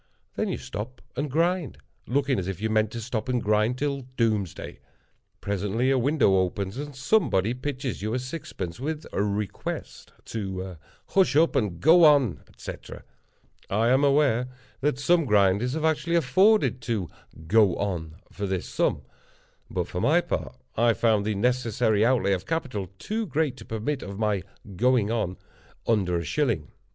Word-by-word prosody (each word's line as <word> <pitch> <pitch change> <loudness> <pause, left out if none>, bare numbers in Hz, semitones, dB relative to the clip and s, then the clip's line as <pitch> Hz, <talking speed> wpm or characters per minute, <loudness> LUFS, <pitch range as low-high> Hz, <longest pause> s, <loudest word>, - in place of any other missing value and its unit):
Then - - -1
you - - -2
stop 120 +5 -7 0.2
and 145 +3 -2
grind; 165 - 0 0.3
looking 135 0 +1
as 90 - -4
if 95 -3 -4
you 110 +1 -1
meant 110 -1 +2
to 120 - -4
stop 115 +1 -3
and 125 -1 +1
grind 110 +3 +1
till 140 0 -1 0.2
doomsday. 110 -7 -1 0.6
Presently 105 +6 0
a 135 - +3
window 125 -7 +3
opens, 95 +1 -1
and 145 0 -6
somebody 135 - +2
pitches 130 -2 -4
you 110 +3 -2
a - - +1
sixpence, 125 - -6
with 150 +3 -4
a - - 0
request 105 -1 -4
to 95 -4 -5 0.3
"Hush 190 -7 +3
up 165 +2 +4
and 100 -9 0
go 165 - +6
on," 140 - +4
etc. - - -9 0.7
I 110 +4 +2
am 130 +3 +4
aware 140 -4 +3 0.3
that 140 -1 0
some 165 +3 +3
grinders 105 +2 +3
have 160 +1 -1
actually 160 +2 +1
afforded 185 - +3
to 105 -7 -2 0.4
"go 105 0 +4
on" 85 -6 -3 0.2
for 100 0 -4
this 95 -2 -2
sum; - - 0 0.7
but - - -2
for - - -4
my - - +4
part, - - -4 0.2
I 115 +1 +4
found 110 -2 +2
the 110 - 0
necessary 115 -1 +1
outlay 115 -5 +3
of 95 0 -3
capital 125 - -2
too 220 - -3
great 150 -3 0
to - - -11
permit 115 +6 -3
of 100 0 -7
my 105 -3 0 0.3
"going 120 0 +2
on" 100 -6 -1 0.5
under 95 -6 +1
a 85 - -2
shilling. 100 - -1
115 Hz, 165 wpm, -26 LUFS, 100-140 Hz, 0.7 s, go